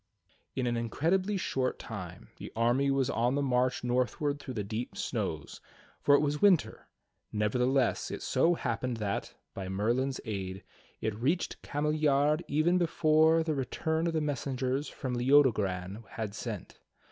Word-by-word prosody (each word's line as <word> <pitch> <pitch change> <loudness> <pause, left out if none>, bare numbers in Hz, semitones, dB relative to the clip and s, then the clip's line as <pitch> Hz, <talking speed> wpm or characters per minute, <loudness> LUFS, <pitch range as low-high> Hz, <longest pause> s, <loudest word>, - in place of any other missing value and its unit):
In 130 - 0
an 120 -1 0
incredibly 180 - 0
short 130 -7 -1
time 90 -6 -8
the - - -8
army 120 +5 +2
was 135 -2 +2
on 125 -1 +1
the 145 - +1
march 125 -1 +1
northward 125 +4 0
through 130 -3 -7
the 105 - -1
deep 110 +4 -5
snows, - - -3 0.4
for 145 - +5
it - - +4
was 150 0 -1
winter; 195 -6 +3 0.4
nevertheless, 125 +5 +1
it - - -5
so 170 +1 +3
happened 125 -3 -2
that, 105 -2 -3 0.2
by 95 -1 -5
Merlin's 120 +8 0
aid, 95 -3 -4 0.4
it 110 - -1
reached 135 - -1
Cameliard 150 0 +1
even 165 +5 +2
before 160 -1 +4
the 160 -1 -1
return 160 +4 -1
of 165 - -1
the 160 - +1
messengers 135 -1 -1
whom 130 -3 -5
Leodogran 110 -7 +2
had 110 -3 -4
sent. 110 -3 -6
130 Hz, 145 wpm, -30 LUFS, 115-150 Hz, 0.4 s, for